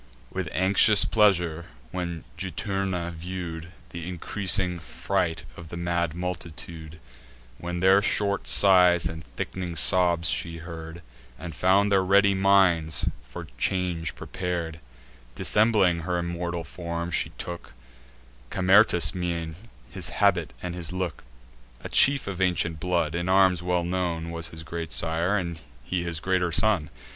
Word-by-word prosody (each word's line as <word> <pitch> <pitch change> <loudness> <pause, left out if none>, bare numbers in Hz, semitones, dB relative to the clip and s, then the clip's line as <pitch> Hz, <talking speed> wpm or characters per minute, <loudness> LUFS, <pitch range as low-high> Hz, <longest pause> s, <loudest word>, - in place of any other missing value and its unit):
With 95 -4 -4
anxious 100 +3 +4
pleasure 90 -6 +2 0.2
when 85 -3 -4
Juturna 95 -3 -3
view'd 85 0 -7 0.2
Th' - - -8
increasing 90 +1 0
fright 85 +3 -2
of 85 - -10
the 85 - -8
mad 85 -2 -1
multitude, 85 -2 -7 0.6
When 90 0 -4
their 95 +1 +5
short 100 -5 -1
sighs 90 +6 +5
and 80 -1 -7
thick'ning 90 -2 -5
sobs 85 -1 +3
she 85 -2 -1
heard, 85 0 -9 0.3
And 85 -2 -7
found 100 +4 +3
their 95 -1 +4
ready 100 +1 +4
minds 95 -5 +3 0.2
for - - -8
change 90 -3 -1
prepar'd; 85 -3 -4 0.6
Dissembling 105 - +3
her 90 +1 -2
immortal 85 0 -3
form, 85 +1 -5
she - - +1
took 85 0 -8 0.8
Camertus' 95 -4 +4
mien, 85 -3 -3 0.4
his 90 -2 0
habit, 90 -4 +1
and 90 -1 -4
his 85 -2 -4
look; 90 -3 -4 0.6
A - - -6
chief 140 0 +3
of 95 -2 -5
ancient 85 -3 0
blood; 85 -2 0
in 85 +1 -2
arms 95 -2 +4
well 90 0 0
known 85 -2 -2
Was 85 -1 -3
his 80 0 -9
great 80 0 -6
sire, 85 +5 +2
and 85 -3 -4 0.2
he 90 +6 -2
his 85 -2 -3
greater 90 +1 0
son. 90 -4 +2
85 Hz, 135 wpm, -26 LUFS, 85-95 Hz, 0.8 s, their